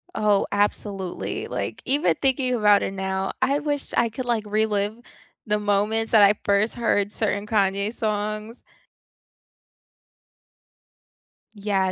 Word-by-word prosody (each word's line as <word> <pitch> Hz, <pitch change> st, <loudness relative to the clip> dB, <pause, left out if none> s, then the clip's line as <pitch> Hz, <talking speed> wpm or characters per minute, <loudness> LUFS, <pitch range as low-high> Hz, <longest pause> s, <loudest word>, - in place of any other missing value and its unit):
Oh, 210 Hz, -2 st, +2 dB
absolutely, 200 Hz, -2 st, -2 dB
like, -, -, -4 dB
even 285 Hz, +5 st, +2 dB
thinking 260 Hz, -2 st, +1 dB
about 210 Hz, -3 st, +4 dB
it -, -, -2 dB
now, 190 Hz, 0 st, -2 dB
I 280 Hz, +2 st, +2 dB
wish 290 Hz, -1 st, -3 dB
I 235 Hz, -, +2 dB
could, 250 Hz, +3 st, -6 dB
like, 235 Hz, -3 st, 0 dB
relive 210 Hz, 0 st, 0 dB, 0.5 s
the 210 Hz, -2 st, 0 dB
moments 210 Hz, +2 st, 0 dB
that 215 Hz, -2 st, +7 dB
I 200 Hz, +1 st, +7 dB
first 200 Hz, +2 st, +1 dB
heard 205 Hz, -4 st, +1 dB
certain 205 Hz, -2 st, -2 dB
Kanye 200 Hz, 0 st, 0 dB
songs. 215 Hz, +1 st, -3 dB, 3.0 s
Yeah, 200 Hz, -2 st, 0 dB
210 Hz, 120 wpm, -24 LUFS, 200-225 Hz, 3.0 s, that